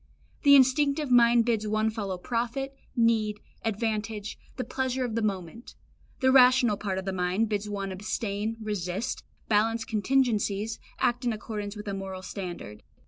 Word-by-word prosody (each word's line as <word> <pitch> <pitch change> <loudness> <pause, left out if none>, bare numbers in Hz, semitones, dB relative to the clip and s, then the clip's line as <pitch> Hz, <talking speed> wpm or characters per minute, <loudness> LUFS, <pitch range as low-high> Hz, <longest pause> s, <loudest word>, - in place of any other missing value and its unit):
The 280 -1 +7
instinctive 280 +2 +3
mind 235 -1 +6
bids 225 -3 0
one 215 +1 +1
follow 200 -4 -3
profit, 245 +7 -3 0.2
need, 220 -3 +2 0.2
advantage, 220 -1 -2 0.2
the 255 - -1
pleasure 260 -1 -2
of 235 - -4
the 230 - 0
moment; 200 +1 -4 0.5
the 260 0 +4
rational 250 -4 +6
part 195 -2 -3
of 190 - -4
the 195 - -2
mind 185 +4 0
bids 210 0 -2
one 200 -1 -3
abstain, 210 +2 -3
resist, 205 -1 -3 0.2
balance 225 +1 +2
contingencies, 220 -3 0 0.2
act 245 +1 +1
in 240 - +1
accordance 210 -1 -5
with 210 0 -8
a 200 - -2
moral 190 -1 -6
standard. 175 - -7
220 Hz, 150 wpm, -28 LUFS, 200-240 Hz, 0.5 s, The